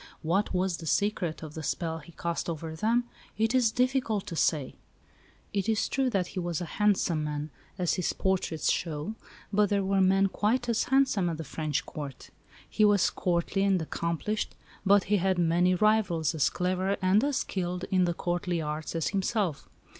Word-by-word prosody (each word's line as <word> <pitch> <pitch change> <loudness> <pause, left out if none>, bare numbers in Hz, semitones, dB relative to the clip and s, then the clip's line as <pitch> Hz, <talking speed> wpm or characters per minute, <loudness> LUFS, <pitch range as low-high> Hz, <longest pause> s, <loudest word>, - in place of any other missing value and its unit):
What 175 +6 +1
was 185 -1 0
the 165 - -8
secret 180 -5 0
of 155 -1 -8
the 160 - -6
spell 165 +1 -2
he 160 +2 -15
cast 170 +1 -3
over 160 -1 -5
them 230 +8 +2 0.3
it 225 +2 +1
is 250 -3 +4
difficult 250 -4 0
to 170 - -6
say. 150 -4 +1 0.8
It 200 +1 0
is 220 -2 +1
true 270 -1 +1
that 195 -6 0
he - - -4
was 175 -3 -2
a 175 - -3 0.2
handsome 185 -6 +2
man, 150 0 -4 0.3
as 180 -3 +1
his 180 - 0
portraits 185 -5 0
show, 155 +4 -2 0.4
but 205 0 +3
there 200 -1 +1
were 195 0 +2
men 195 +1 +4
quite 225 +6 0
as 235 -2 +1
handsome 265 -9 +2
at 165 - -3
the 160 - -5
French 155 0 -2
Court; 145 -4 -8 0.4
he 215 - +1
was 205 -3 +4
courtly 175 +2 0
and 195 -2 +3
accomplished, 170 +6 -2 0.3
but 200 0 +5
he 205 +1 +2
had 190 0 +1
many 175 +2 +3
rivals 195 -6 +2
as 155 -3 +2
clever 185 +2 -1
and 190 +4 +3
as 285 -1 +1
skilled 180 -6 -2
in 180 -2 +3
courtly 175 0 -2
arts 155 +1 -4
as 165 - 0
himself. 195 -4 -1
185 Hz, 180 wpm, -28 LUFS, 165-205 Hz, 0.8 s, but